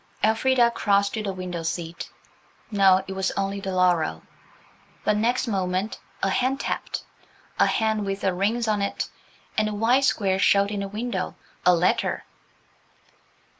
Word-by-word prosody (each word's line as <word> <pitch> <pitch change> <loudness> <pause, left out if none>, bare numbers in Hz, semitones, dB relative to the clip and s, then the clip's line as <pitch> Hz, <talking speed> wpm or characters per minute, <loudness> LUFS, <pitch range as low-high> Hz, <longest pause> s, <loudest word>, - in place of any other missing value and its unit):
Elfrida 235 +2 +4
crossed 200 -3 +1
to 220 - -2
the 200 -2 -2
window 180 -2 -5
seat. 165 0 -4 0.6
No, 190 -2 +5
it 190 - -4
was 190 0 0
only 195 0 -1
the 195 -1 -4
laurel. 175 - +2 0.8
But 210 - +2
next 240 +4 +1
moment 190 0 -1 0.2
a 195 - +3
hand 260 +6 +1
tapped–a - - -3
hand 220 -1 +1
with 195 0 -3
rings 200 +5 +1
on 210 -2 +1
it, 200 - -2 0.5
and 215 0 +1
a 210 - -4
white 245 +6 +3
square 195 -6 +1
showed 200 +2 +4
in 205 - -2
the 200 - -3
window–a 195 -4 -1
letter. 175 +2 +1
200 Hz, 140 wpm, -25 LUFS, 185-220 Hz, 0.8 s, No